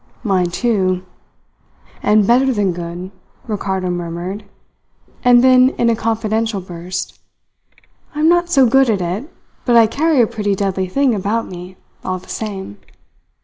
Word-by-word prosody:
"Mine, 190 -5 +1
too 185 -3 0 1.0
and 210 -1 +3
better 255 +4 +3
than 205 -6 0
good," 175 +2 -7 0.3
Ricardo 190 -4 -2
murmured, 175 +4 -5 0.8
and 245 0 +6
then, 255 0 +6
in 235 0 +3
a - - +1
confidential 225 -1 -1
burst: 180 0 -6 1.0
"I 300 - -2
am 315 - +4
not 345 +1 +3
so 275 -6 +5
good 265 +2 +4
at 210 -3 +1
it, 190 - -4 0.3
but 240 - +2
I 230 -1 +7
carry 300 +6 +1
a 235 - +6
pretty 205 -2 -2
deadly 190 -1 -1
thing 275 +4 +2
about 210 +3 -1
me, 180 +1 -10 0.3
all 185 - -2
the 185 - -15
same!" 190 - -6
210 Hz, 145 wpm, -18 LUFS, 185-240 Hz, 1.0 s, I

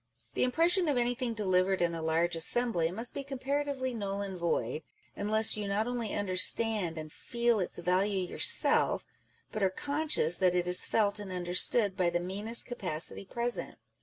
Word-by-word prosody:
The - - -3
impression 335 +8 +2
of 285 -4 0
anything 245 0 -2
delivered 190 -2 0
in 170 -1 0
a 165 - -5
large 165 +2 -1
assembly 175 0 +2
must 225 +7 -4
be 280 - -6
comparatively 275 -1 -4
null 200 -3 -4
and 195 -2 -6
void, 160 -6 -3 0.3
unless 215 +2 +3
you 210 -1 -4
not 200 +2 -1
only 240 -3 -4
understand 200 -1 +3
and 155 -1 -8
feel 235 -2 -1
its 185 - -4
value 185 +2 -1
your - - -10
self, - - +3 0.5
but 215 - -5
are 190 - +2
conscious 285 - 0
that 180 -2 +1
it 175 -1 0
is 180 0 +4
felt 205 -2 -1
and 200 -2 -8
understood 185 +3 +2
by 180 -3 0
the 175 0 -2
meanest 205 +6 0
capacity 185 -6 -4
present. 240 +4 -3
200 Hz, 170 wpm, -29 LUFS, 180-240 Hz, 0.5 s, is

